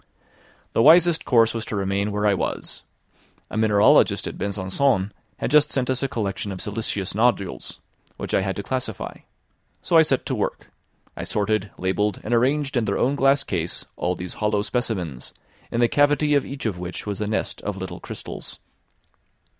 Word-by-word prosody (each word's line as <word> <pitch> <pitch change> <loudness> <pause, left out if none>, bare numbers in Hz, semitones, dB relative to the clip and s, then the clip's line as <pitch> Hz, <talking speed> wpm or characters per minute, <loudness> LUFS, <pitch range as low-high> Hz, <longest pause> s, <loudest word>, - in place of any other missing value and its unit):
The - - +3
wisest 165 +3 +6
course 115 -3 +4
was 115 -1 -3
to - - -4
remain 100 +1 0
where 105 +1 -1
I 105 - +4
was. 95 - -3 0.7
A - - -5
mineralogist 105 -2 +4
at - - -5
Besançon 100 +2 0 0.3
had - - -3
just 150 0 +5
sent 130 -1 0
us 130 - -1
a 135 - +1
collection 105 -4 -3
of 95 - -6
siliceous 105 -2 -2
nodules, 110 -4 0 0.4
which - - -5
I - - +3
had 95 0 -2
to 100 - -4
classify: 125 -5 -4 0.7
so 170 - +3
I - - +9
set 135 -5 +1
to - - -2
work; - - -3 0.4
I - - -5
sorted, 105 0 -1
labelled, 95 +2 0
and 115 - -2
arranged 135 +4 +2
in 120 -3 +2
their 100 -2 0
own 130 +3 +2
glass 140 0 +3
case 85 -6 -2
all 90 +1 -1
these 90 0 -6
hollow 105 -1 +1
specimens, 95 - -3 0.3
in 120 - -1
the 120 - +5
cavity 145 +3 +3
of 140 - +2
each 140 -1 -6
of 100 -6 -2
which 90 0 -6
was 105 -1 -4
a 105 - -1
nest 110 - -2
of 105 -1 -4
little 95 -2 -6
crystals. - - -8
110 Hz, 180 wpm, -23 LUFS, 100-130 Hz, 0.7 s, I